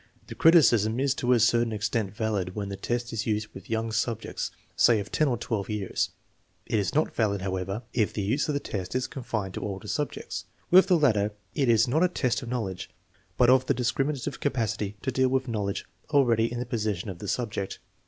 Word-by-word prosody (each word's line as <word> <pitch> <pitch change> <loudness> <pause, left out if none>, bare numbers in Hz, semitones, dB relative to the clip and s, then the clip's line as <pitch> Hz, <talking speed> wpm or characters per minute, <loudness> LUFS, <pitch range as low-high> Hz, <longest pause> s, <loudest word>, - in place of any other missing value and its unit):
The - - -8
criticism 120 - +5
is 135 0 +2
to 125 -2 0
a 125 - +5
certain 115 +1 +3
extent 105 -2 -2
valid 105 -5 -2
when 100 -2 -3
the 100 - -4
test 120 +4 -3
is 115 +1 -2
used 110 0 -1
with 95 - -11
young 115 0 -1
subjects, 110 +1 -2 0.3
say 115 -3 +5
of 100 +1 -6
10 155 - +2
or 125 -3 +1
1 110 -3 -2
years. 105 -3 -1 0.6
It 110 - 0
is 100 - -2
not 155 - +2
valid, 100 -4 0
however, 95 +3 -3
if 110 -4 +1
the 105 - -3
use 130 +9 0
of 150 - 0
the - - +1
test 95 -5 -5
is 130 0 +1
confined 110 -7 -4
to - - -5
older 95 -2 -5
subjects. - - -3 0.3
With 185 +2 +8
the 180 -3 +5
latter, 105 -9 +2 0.2
it 135 -5 +1
is 115 0 +5
not 155 +8 +2
a - - +6
test 130 -8 -1
of 120 - -7
knowledge, 105 -7 -3 0.5
but 125 0 +6
of 130 0 +4
the - - +2
discriminative 130 +2 -1
capacity 110 -6 -1
to 130 - 0
deal 130 +1 +2
with 130 0 0
knowledge 105 -4 -2 0.2
already 120 -6 +3
in 120 - -4
the 125 - -2
possession 110 -5 -2
of 90 - -10
the - - -6
subject. 105 -5 -2
115 Hz, 210 wpm, -27 LUFS, 105-130 Hz, 0.6 s, With